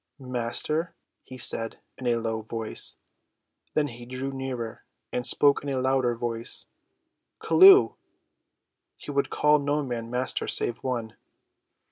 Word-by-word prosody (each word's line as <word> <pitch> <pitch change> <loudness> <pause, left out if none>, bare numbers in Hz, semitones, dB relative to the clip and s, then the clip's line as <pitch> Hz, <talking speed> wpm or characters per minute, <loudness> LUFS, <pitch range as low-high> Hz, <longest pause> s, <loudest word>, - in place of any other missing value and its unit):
"Master," 135 +6 -3 0.3
he 130 - -11
said, 115 -2 -1 0.2
in 130 - -6
a 120 - +3
low 115 -1 -2
voice. 110 0 -2 0.8
Then 150 -1 +2
he 120 0 -11
drew 130 +2 -4
nearer, 130 -4 -5 0.3
and 125 0 0
spoke 140 +2 +4
in 145 - -5
a 135 -1 -1
louder 130 -2 +1
voice; 115 0 -2 0.7
"Chelluh." 390 +1 +7 1.0
He - - -8
would 140 -1 0
call 150 0 +3
no 145 +1 0
man 120 -3 -4
master 125 +2 -2
save 120 - -1
one. 120 -4 -3
130 Hz, 130 wpm, -26 LUFS, 115-140 Hz, 1.0 s, Chelluh